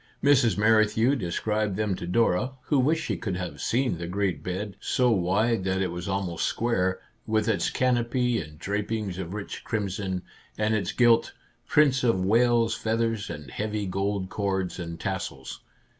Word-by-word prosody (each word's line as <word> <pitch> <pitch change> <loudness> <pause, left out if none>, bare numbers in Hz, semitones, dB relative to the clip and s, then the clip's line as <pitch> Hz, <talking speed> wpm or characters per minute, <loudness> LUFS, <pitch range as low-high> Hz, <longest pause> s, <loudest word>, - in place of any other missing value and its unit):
Mrs. 135 -6 +4
Merrithew 110 +4 +4
described 105 0 -1
them 105 -1 0
to 85 - -6
Dora, 115 +4 +2
who 145 - +2
wished 155 +5 +2
she - - -2
could 95 -5 -3
have 90 -2 -5
seen 125 -7 0
the 85 - -4
great 90 -4 -1
bed, 95 +3 -4
so 125 +3 +2
wide 100 +3 +1
that 95 0 0
it 95 -2 0
was 90 +2 -5
almost 95 -3 -1
square, 95 -6 0 0.3
with 110 0 +1
its 110 -3 +1
canopy 125 -1 +1
and 75 -1 -11
drapings 100 +1 -3
of 95 +1 -5
rich 105 -1 -6
crimson, 95 -3 -2 0.3
and 110 +1 +1
its 100 -4 0
gilt 120 -2 +4 0.2
" - - -41
Prince 140 -3 +4
of 95 -7 +2
Wales 115 +2 +3
feathers," 115 -1 -1
and 75 -3 -7
heavy 105 +2 -2
gold 95 0 -2
cords 95 -3 -2
and 85 -1 -6
tassels. 65 -4 -5
105 Hz, 165 wpm, -26 LUFS, 95-115 Hz, 0.3 s, Mrs